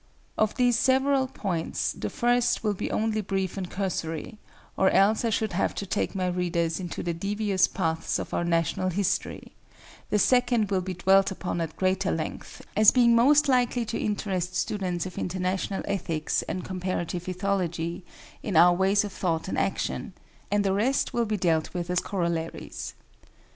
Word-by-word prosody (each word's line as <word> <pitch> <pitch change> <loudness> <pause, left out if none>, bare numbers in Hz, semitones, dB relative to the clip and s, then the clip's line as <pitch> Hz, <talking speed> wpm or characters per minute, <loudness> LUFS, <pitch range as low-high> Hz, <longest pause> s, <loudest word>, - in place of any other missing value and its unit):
Of 215 -1 +1
these 245 -2 +3
several 265 +1 +3
points, 190 -10 -2
the - - -4
first 245 -1 +1
will 210 -2 +1
be 190 - -4
only 215 0 0
brief 190 -2 -2
and 185 -3 -4
cursory, 180 0 -4 0.4
or 190 - +4
else 210 +4 +3
I 230 - +1
should 220 -2 -1
have 180 - 0
to 200 - -4
take 195 - -2
my 185 -1 0
readers 175 -2 -1
into 175 -2 -5
the 170 - -1
devious 200 +2 +1
paths 165 -3 -1
of - - -6
our - - 0
national 170 +2 0
history; 195 +1 -2 0.6
the 210 - +2
second 240 -2 +3
will 190 -1 +2
be 185 0 -5
dwelt 190 +2 +4
upon 180 -2 -3
at 160 -2 -4
greater 190 0 +1
length, 160 - -5
as 215 +1 +8
being 240 -2 +4
most 285 +6 +5
likely 245 -2 +2
to 225 - -3
interest 185 -3 -2
students 185 -4 -1
of 185 - -6
International 185 +1 -2
Ethics 165 -6 -1
and 185 - -3
Comparative 180 -1 -3
Ethology 180 -3 -2 0.4
in 200 - -3
our 175 +2 +7
ways 195 +3 +3
of 205 -2 -6
thought 165 -2 -1
and - - -2
action; - - -2 0.4
and 205 0 +2
the 190 - +2
rest 235 +8 +1
will 235 -1 +1
be 215 -1 -1
dealt 165 -2 0
with 175 0 -3
as 180 - +2
corollaries. 170 -5 -3
190 Hz, 170 wpm, -26 LUFS, 175-215 Hz, 0.6 s, as